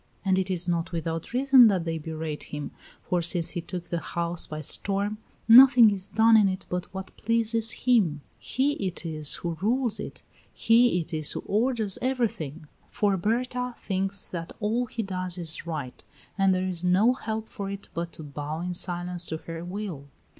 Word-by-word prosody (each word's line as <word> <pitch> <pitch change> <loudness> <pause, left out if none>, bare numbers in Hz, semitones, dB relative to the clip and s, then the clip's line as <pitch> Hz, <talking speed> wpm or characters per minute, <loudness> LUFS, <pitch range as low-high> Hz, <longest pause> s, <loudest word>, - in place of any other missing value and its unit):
And 190 -1 +3
it 190 0 -1
is 180 -1 -1
not 170 -1 -1
without 165 -1 -4
reason 260 -1 +6
that 190 -5 +1
they 165 -1 -3
berate 155 -1 -5
him, 150 -1 -5 0.3
for 180 -1 0
since 170 0 -1
he 175 - -4
took 175 +1 -7
the 170 - -1
house 170 0 -2
by 155 0 -6
storm 200 +7 -2 0.3
nothing 245 -1 +9
is 195 -1 0
done 225 +1 +5
in 210 -3 +5
it 185 0 -5
but 180 0 -4
what 190 0 -8
pleases 230 0 +2
him; 195 - +3 0.2
he 270 +3 0 0.2
it 180 -1 -5
is 155 -2 +2
who 170 -1 -4
rules 240 +2 +1
it, - - -7 0.3
he 230 -4 +3
it 165 +1 -9
is 155 -2 0
who - - -4
orders 220 -2 0
everything. 215 - -2 0.2
For 205 -2 +1
Berta 250 +5 -1
thinks 195 0 -2
that 170 -1 -6
all 230 +4 0
he 225 0 -4
does 185 -2 -3
is 165 -1 -4
right, 145 -7 -5 0.3
and 195 -1 +3
there 185 0 0
is 180 -2 -4
no 190 +7 +4
help 220 -3 -4
for 200 -5 -6
it 200 0 -7
but 170 +1 -4
to 160 - -9
bow 150 +2 -5
in 180 +1 -3
silence 175 0 -1
to 160 - -2
her 165 +1 -8
will. 180 -6 -6
185 Hz, 185 wpm, -26 LUFS, 170-220 Hz, 0.3 s, nothing